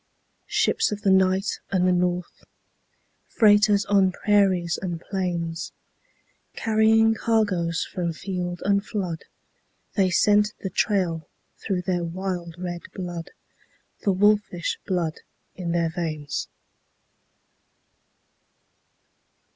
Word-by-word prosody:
Ships - - +1
of 205 0 -5
the 195 - +4
night 190 +2 +2
and 185 -2 +2
the - - +4
north, 180 0 -1 0.8
Freighters 205 -2 +4
on 195 -2 +3
prairies 185 -4 +2
and 175 -3 -3
plains, 170 -3 -3 0.8
Carrying 225 0 +4
cargoes 205 -7 0
from 175 -2 -3
field 175 +1 -4
and 200 0 +2
flood 185 -7 -4 0.7
They 195 -3 +2
scent 210 +3 +3
the 190 - -4
trail 175 -6 0 0.3
through 185 -4 -1
their 175 -1 -1
wild 175 -1 -4
red 175 -1 -5
blood, 175 -2 -5 0.7
The 200 - +1
wolfish 200 -2 +1
blood 175 -4 -1 0.4
in 175 -2 -3
their 170 -1 +1
veins. 155 -4 -3
185 Hz, 100 wpm, -24 LUFS, 175-205 Hz, 0.8 s, the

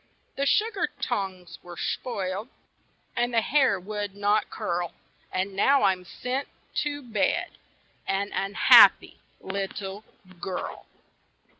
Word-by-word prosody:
The 280 +1 0
sugar 440 +8 +1
tongs 185 -3 -4
were 175 -1 -11
spoiled, 200 -1 -3 0.7
And 240 +1 0
the 230 -1 +3
hair 260 -5 +2
would 205 +1 -5
not 205 +1 +1
curl, 175 -1 -3 0.4
And 190 +1 -2
now 275 +7 +4
I'm 185 -2 +2
sent 255 +8 -4 0.3
to 290 -1 -3
bed, 220 -5 0 0.6
An 200 +1 -1
unhappy 195 +2 +6 0.2
little 195 +1 -5 0.4
girl. 180 +1 -5
200 Hz, 110 wpm, -26 LUFS, 190-240 Hz, 0.7 s, unhappy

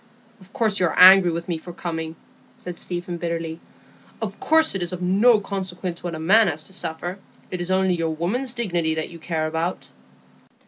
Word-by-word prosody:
"Of 190 0 -18
course 220 -5 0
you 180 - +3
are - - -4
angry 185 0 +9
with 170 +1 -4
me 170 -3 -2
for 175 +2 -10
coming," 160 -2 -5 0.4
said 180 -1 -7
Stephen, 175 0 -4
bitterly. 165 -1 -4 0.6
"Of - - -5
course 320 0 +3
it 195 - -3
is 175 0 -2
of 180 - -5
no 210 +5 +4
consequence 185 -3 -5
what 175 -2 -4
a - - -6
man 210 +7 +5
has 155 +1 -1
to 190 - -8
suffer; 175 +1 -4 0.3
it 180 -1 -3
is 175 - -3
only 190 0 +2
your 165 -2 -1
woman's 220 +11 -2
dignity 175 -9 0
that 160 +1 -4
you 170 - -11
care 160 -1 -2
about." 160 +3 -3
175 Hz, 195 wpm, -23 LUFS, 165-190 Hz, 0.6 s, angry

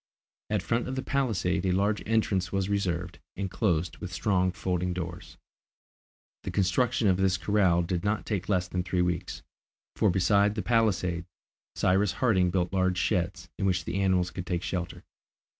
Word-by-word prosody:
At 105 -2 +1
the - - -16
front 120 +2 0
of 130 - -3
the 130 - -3
palisade 95 -9 0
a 95 - +1
large 100 +3 +1
entrance 100 -5 +1
was 95 0 -1
reserved, 90 -3 -2 0.2
and 95 -1 -3
closed 85 -6 0
with 95 -3 -7
strong 90 0 +1
folding 90 0 -2
doors. 90 0 -6 1.0
The - - -5
construction 105 +4 +1
of 95 -2 +3
this 95 -1 +2
corral 95 -4 +2
did 85 0 -2
not 105 +1 -1
take 100 -4 -3
less 90 -2 +1
than 90 0 -2
three 90 0 0
weeks, 90 -1 -3 0.5
for 105 - +3
besides 100 +3 +3
the 105 - -2
palisade, 95 -7 +1 0.5
Cyrus 95 0 +2
Harding 95 -3 +2
built 90 0 -1
large 95 -1 +1
sheds, 90 -2 -1
in 95 - +1
which 90 -1 0
the 95 +3 -2
animals 90 -2 +2
could 90 -2 -6
take 90 -1 -1
shelter. 90 -2 -4
95 Hz, 175 wpm, -28 LUFS, 90-100 Hz, 1.0 s, of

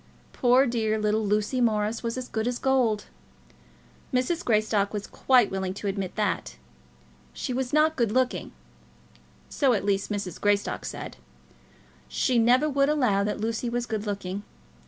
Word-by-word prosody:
Poor 255 +2 +4
dear 225 -3 0
little 215 0 +1
Lucy 210 +5 0
Morris 215 -1 +1
was 230 +1 -3
as 255 -1 -5
good 220 +1 -2
as 245 0 -1
gold. 245 -6 +1 1.1
Mrs. 260 +7 0
Greystock 215 -2 +1
was 205 - -3
quite 250 -5 +3
willing 190 -1 -3
to 205 - -7
admit 195 -2 -3
that. 210 -1 -1 0.8
She 255 - -4
was 255 0 -2
not 310 +1 +3
good 235 -4 +1
looking; 255 +2 0 1.0
so 270 -4 +2
at 205 - -1
least 200 -1 0
Mrs. 200 -4 -4
Greystock 205 0 0
said. - - -6 0.9
She 240 - +1
never 250 +6 +4
would 280 -1 +2
allow 250 -10 +2
that 210 0 -2
Lucy 225 +2 -2
was 240 0 -2
good 215 -2 -4
looking. 200 -1 -3
225 Hz, 155 wpm, -26 LUFS, 205-250 Hz, 1.1 s, Poor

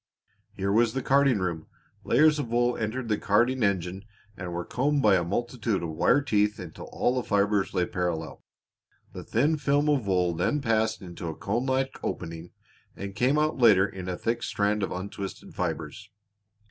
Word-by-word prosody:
Here 100 +1 -2
was 115 +2 +3
the 130 - -2
carding 135 -3 +4
room. 85 -4 -3 0.4
Layers 150 0 +4
of 130 -5 -3
wool 120 +1 +2
entered 115 +3 -3
the 105 -2 0
carding 120 +5 +2
engine 95 -2 0 0.3
and 90 -2 -6
were 85 0 -4
combed 140 +2 0
by 105 -3 +6
a 90 - +2
multitude 115 +2 -2
of 85 - -3
wire 90 - +3
teeth 105 -4 +1
until 90 -6 -9
all 125 - 0
the 130 - 0
fibers 100 -2 +1
lay 90 - +2
parallel; 85 -5 -3 0.7
the - - -7
thin 145 +8 +1
film 145 0 +1
of 135 -8 +1
wool 90 -2 +2
then 90 - 0
passed 110 -5 0
into 85 -1 -7
a 80 - -4
cone 120 +6 -2
like 130 0 -1
opening 80 +1 -5 0.5
and 100 0 -6
came 130 +6 +2
out 155 -2 +1
later 105 -5 +6
in 95 -2 -7
a 90 - -3
thick 115 +4 -1
strand 105 +1 0
of 95 - -2
untwisted 95 +1 -6
fibers. 100 - -4
105 Hz, 180 wpm, -27 LUFS, 95-125 Hz, 0.7 s, by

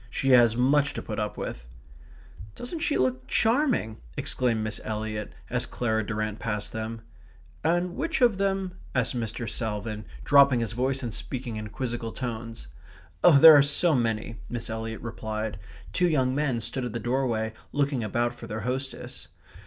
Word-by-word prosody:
She 135 +3 0
has 120 -3 +6
much 140 +3 +3
to - - -3
put - - -4
up - - -3
with." - - -5 0.9
"Doesn't 285 +7 -5
she 305 - +1
look 130 0 0
charming?" 230 - +2 0.2
exclaimed 120 -4 0
Miss 110 -1 -4
Eliot, 110 -1 -3 0.2
as - - -2
Clara 110 -2 0
Durrant 110 0 -3
passed 105 -2 -3
them. 110 0 -4 0.6
"And 175 +2 +1
which 330 -1 -1
of 235 -6 +4
them...?" 195 -2 -1 0.2
asked 125 0 +1
Mr. 115 0 -3
Salvin, 110 -2 -3 0.2
dropping 140 - +6
his 115 -3 -2
voice 130 +3 -1
and 115 -3 -3
speaking 125 -1 -5
in 110 0 -5
quizzical 115 0 -4
tones. 115 - -5 0.6
"There 160 -1 +10
are 145 - +8
so 150 +4 +2
many 115 -2 -1
..." - - -15
Miss 120 -2 -4
Eliot 115 0 -4
replied. 110 -3 -4 0.3
Three 180 -1 +3
young 130 -5 +2
men 135 -5 0
stood 120 +4 -3
at 120 - -5
the 115 - -2
doorway 115 -2 0 0.2
looking 140 -4 0
about 120 +3 0
for 120 -1 -10
their 110 +1 -4
hostess. 130 +4 -5
120 Hz, 165 wpm, -27 LUFS, 110-140 Hz, 0.9 s, There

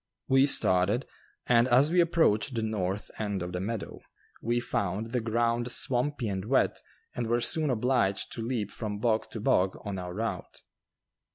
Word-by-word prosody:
We 135 +1 +4
started, 100 0 +2 0.4
and 120 0 +4
as 130 +5 +4
we 180 0 +5
approached 160 -8 +2
the 115 - -1
north 105 -2 -3
end 100 -4 -2
of 90 - -5
the 90 - -3
meadow 110 +3 -5 0.4
we 120 +1 0
found 110 -2 -2
the 125 -1 0
ground 115 +2 0
swampy 125 +1 0
and 95 -2 -3
wet 130 +4 +1 0.3
and 120 -2 -3
were 120 +1 +1
soon 155 +5 +2
obliged 120 -5 0
to 115 - -5
leap 115 -3 -2
from 105 -3 -4
bog 110 0 0
to 110 - -6
bog 95 -6 +1
on 100 -2 -4
our 90 -1 -6
route. 110 -4 -5
115 Hz, 170 wpm, -28 LUFS, 100-125 Hz, 0.4 s, we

